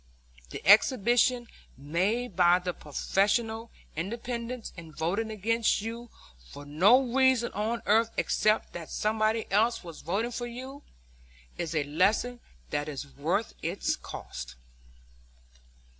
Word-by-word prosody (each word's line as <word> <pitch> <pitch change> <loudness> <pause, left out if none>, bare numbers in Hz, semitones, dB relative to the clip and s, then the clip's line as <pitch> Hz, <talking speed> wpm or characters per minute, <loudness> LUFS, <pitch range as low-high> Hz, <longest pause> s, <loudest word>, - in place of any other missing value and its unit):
The - - -8
exhibition 240 +3 +5 0.3
made 185 - -1
by 175 0 +5
the 180 -1 -3
professional 220 - 0 0.3
independents 235 +6 -4
in 165 -2 -10
voting 200 +8 -1
against 220 +1 +1
you 230 +2 -6 0.4
for 145 - -10
no 185 - +5
reason 260 -3 +3
on 220 +3 -2
earth 225 +2 +4
except 215 +1 +1
that 170 -2 -7
somebody 215 +1 0
else 225 +4 +2
was 170 -3 -10
voting 205 +9 -1
for 240 0 -4
you, 260 +4 -8 0.8
is 165 -2 -3
a 150 - +2
lesson 200 +11 +1 0.3
that 145 +1 -1
is 145 -1 -5
worth 170 +10 -1
its 175 +5 -1
cost." - - -8
215 Hz, 120 wpm, -28 LUFS, 175-235 Hz, 0.8 s, exhibition